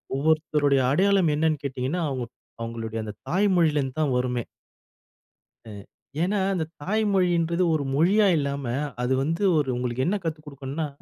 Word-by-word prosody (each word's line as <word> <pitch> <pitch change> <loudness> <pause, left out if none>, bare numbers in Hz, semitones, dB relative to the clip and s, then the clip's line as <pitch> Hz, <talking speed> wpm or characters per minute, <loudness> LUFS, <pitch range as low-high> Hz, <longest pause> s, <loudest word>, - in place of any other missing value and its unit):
ஒவ்வொருத்தருடைய 150 -1 +2
அடையாளம் 190 +1 +3
என்னன்னு 155 -1 +1
கேட்டிங்கன்னா, 135 +6 -2
அவங்க 130 -3 -3 0.4
அவங்களுடைய 115 -1 -4
அந்த 105 -1 -6 0.2
தாய் 195 +4 +2
மொழியிலேருந்து 150 -5 +1
தான் 145 -4 +1
வருமே! 125 -1 -1 1.3
ம். 100 -1 -9 0.4
ஏன்னா 200 +3 0
அந்த 170 -4 -1 0.2
தாய் 215 +8 0
மொழின்றது 175 -2 +2
1 155 -2 0
மொழியா 195 +8 +4
இல்லாம. 140 -1 -2 0.4
அது 125 +1 +1
வந்து 165 +7 -1
1 145 -3 +1
உங்களுக்கு 125 +1 -2
என்ன 195 - +1
கத்து 160 -2 -3
கொடுக்கணும்னா, 140 +2 -4
150 Hz, 140 wpm, -25 LUFS, 130-170 Hz, 1.3 s, மொழியா